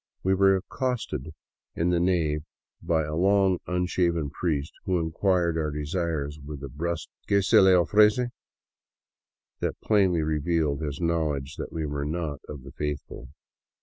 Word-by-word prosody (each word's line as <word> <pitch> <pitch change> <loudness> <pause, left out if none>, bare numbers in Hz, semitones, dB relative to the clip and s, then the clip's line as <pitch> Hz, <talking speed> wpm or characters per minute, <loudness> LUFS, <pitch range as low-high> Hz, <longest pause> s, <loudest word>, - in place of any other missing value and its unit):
We 95 - +3
were 95 0 +5
accosted 115 - -3 0.5
in 85 +2 +1
the 85 - +2
nave 85 -4 +1 0.4
by 80 -1 +1
a 75 +1 -4
long 95 +1 +3
unshaven 90 -4 0
priest 75 -3 -2
who 95 -1 +1
inquired 85 0 +1
our 75 -1 0
desires 75 -1 -2
with 70 -1 -8
a 70 - -5
brusk 85 +4 -3
" - - -39
Que 100 -1 +3
se - - +5
le 95 -1 +6
ofrece? 105 +7 +4 0.6
" - - -67
that - - -2
plainly 95 -6 +3
revealed 75 -1 0
his 75 -3 -4
knowledge 75 -5 -1
that - - -5
we 80 -1 -3
were 70 -1 -3
not 75 -2 -3
of 70 -3 -8
the 70 - -10
" 70 - -29
faithful." 75 -3 -4
85 Hz, 160 wpm, -26 LUFS, 75-90 Hz, 0.6 s, le